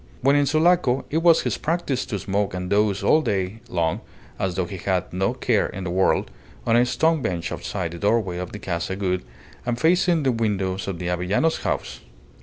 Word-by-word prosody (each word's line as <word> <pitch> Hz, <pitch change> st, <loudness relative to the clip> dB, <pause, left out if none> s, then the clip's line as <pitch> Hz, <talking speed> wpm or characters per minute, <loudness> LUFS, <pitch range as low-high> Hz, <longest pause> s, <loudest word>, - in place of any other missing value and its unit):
When 140 Hz, +2 st, +4 dB
in 145 Hz, -1 st, +3 dB
Sulaco 155 Hz, -4 st, +3 dB
it 160 Hz, -, +2 dB
was 165 Hz, -1 st, +5 dB
his -, -, -1 dB
practice 160 Hz, -5 st, -1 dB
to 105 Hz, -, -2 dB
smoke 100 Hz, 0 st, -1 dB
and 90 Hz, 0 st, -4 dB
doze 100 Hz, -1 st, +2 dB
all 155 Hz, -, +5 dB
day 100 Hz, -4 st, -2 dB
long 85 Hz, +4 st, 0 dB, 0.4 s
(as 95 Hz, -2 st, -1 dB
though 95 Hz, -, 0 dB
he 95 Hz, +2 st, -7 dB
had 90 Hz, 0 st, -1 dB
no 95 Hz, +7 st, 0 dB
care 120 Hz, -4 st, +1 dB
in 95 Hz, -, -7 dB
the 90 Hz, -, -3 dB
world) 95 Hz, +1 st, +1 dB, 0.3 s
on 115 Hz, -, +3 dB
a 120 Hz, +1 st, +4 dB
stone 160 Hz, +4 st, +2 dB
bench 85 Hz, -6 st, -2 dB
outside 90 Hz, -5 st, -4 dB
the 85 Hz, -, -8 dB
doorway 100 Hz, -3 st, +1 dB
of 90 Hz, -1 st, -5 dB
the -, -, -6 dB
Casa 90 Hz, -1 st, -3 dB
Gould 90 Hz, -2 st, -1 dB, 0.4 s
and 120 Hz, -1 st, -2 dB
facing 170 Hz, -1 st, +3 dB
the 130 Hz, -, +3 dB
windows 100 Hz, -5 st, -1 dB
of 95 Hz, -3 st, -3 dB
the 90 Hz, 0 st, -4 dB
Avellanos 90 Hz, -, +1 dB
house. -, -, -3 dB
100 Hz, 205 wpm, -23 LUFS, 90-135 Hz, 0.4 s, was